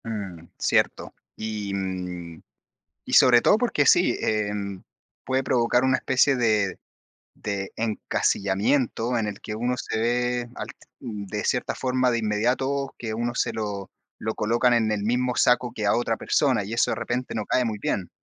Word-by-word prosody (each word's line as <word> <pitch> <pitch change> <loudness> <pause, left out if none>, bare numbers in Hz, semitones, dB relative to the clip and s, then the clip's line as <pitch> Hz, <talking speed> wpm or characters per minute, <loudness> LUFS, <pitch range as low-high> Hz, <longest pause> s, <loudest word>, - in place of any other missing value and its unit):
Mm, 100 -7 -6
cierto, - - +1 0.2
y, 105 -2 -4
mm, 90 -3 -5 0.6
y - - -6
sobre 120 -2 +7
todo 210 - +5
porque 230 -11 +1
sí, 175 - +5
em, 105 -3 -2 0.4
puede 130 0 0
provocar 120 0 +2
una 130 0 +3
especie 130 +1 +3
de 105 -6 +1 0.6
de 100 -2 -3
encasillamiento 115 +2 0
en 115 -3 0
el 105 -1 -6
que 105 - -6
uno 120 +3 -1
se 110 -1 -3
ve 120 +1 0
alt - - -7 0.2
de 105 -3 -5
cierta 125 - 0
forma, 130 -1 +1
de 120 - +1
inmediato, 125 +6 0
que 110 -2 -4
uno 120 +2 -2
se - - 0
lo 100 -3 -4 0.3
lo 110 0 -2
colocan 120 +3 +2
en 110 -2 +2
el 105 -1 -1
mismo 125 +3 0
saco 125 0 +3
que 105 - -3
a 100 - +3
otra 115 -2 0
persona, 130 -8 +1
y 105 +3 -6
eso, 115 - +2
de - - 0
repente 125 +1 -3
no 110 - -2
cae 125 - +2
muy 110 -2 -2
bien. 95 -2 -2
115 Hz, 170 wpm, -25 LUFS, 105-125 Hz, 0.6 s, sobre